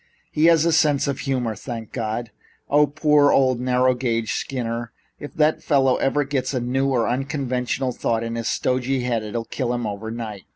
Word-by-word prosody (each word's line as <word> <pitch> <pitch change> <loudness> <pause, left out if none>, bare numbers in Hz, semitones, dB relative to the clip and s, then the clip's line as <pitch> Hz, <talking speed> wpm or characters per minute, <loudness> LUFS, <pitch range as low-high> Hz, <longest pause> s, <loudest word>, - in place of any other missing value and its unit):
"He 155 +1 +2
has 165 -1 +5
a 170 - +3
sense 150 -3 +3
of 140 - -2
humor, 125 -5 -1
thank 115 0 -7
God! 115 -1 -3 0.4
Ah, 150 +1 +5
poor 150 0 +3
old 130 -2 +3
narrow 125 0 +2
gauge 115 -3 -1
Skinner! 120 -3 -3 0.3
If 145 - -9
that 155 0 +2
fellow 135 -4 +2
ever 145 +2 +1
gets 135 -1 -2
a - - +1
new 130 +3 0
or 125 -4 +1
unconventional 130 0 -1
thought 115 -1 -1
in 115 0 -4
his 115 0 -3
stodgy 130 +1 0
head, 120 -2 0
it'll 115 +2 -4
kill 125 -1 -3
him 120 -1 -2
overnight. 110 0 -6
125 Hz, 180 wpm, -22 LUFS, 115-140 Hz, 0.4 s, has